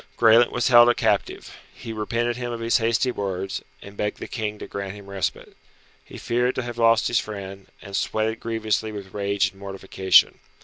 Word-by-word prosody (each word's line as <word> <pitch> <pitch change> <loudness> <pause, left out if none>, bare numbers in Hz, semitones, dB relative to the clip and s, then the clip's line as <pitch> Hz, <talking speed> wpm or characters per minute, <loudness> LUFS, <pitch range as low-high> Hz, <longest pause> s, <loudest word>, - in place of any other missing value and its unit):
Graelent 115 +1 +5
was 120 0 0
held 120 -1 +8
a 120 - +3
captive. - - -1 0.2
He 115 - -7
repented 115 +2 -1
him 120 0 -4
of 120 - -5
his 115 0 +2
hasty 115 +3 +1
words, 95 -3 -4 0.2
and 100 0 -12
begged 105 0 -2
the - - -7
King 105 -3 -4
to - - -8
grant 100 0 -6
him 100 -1 -12
respite. 100 -1 -4 0.5
He - - -12
feared 125 +2 0
to 130 - -2
have 120 0 -7
lost 115 0 +4
his 120 - +2
friend, 100 -2 -7 0.2
and 100 0 -7
sweated 110 +2 -1
grievously 110 -1 -2
with 100 -3 -9
rage 100 -1 0
and 95 - -21
mortification. 95 -1 +2
110 Hz, 190 wpm, -24 LUFS, 100-115 Hz, 0.5 s, held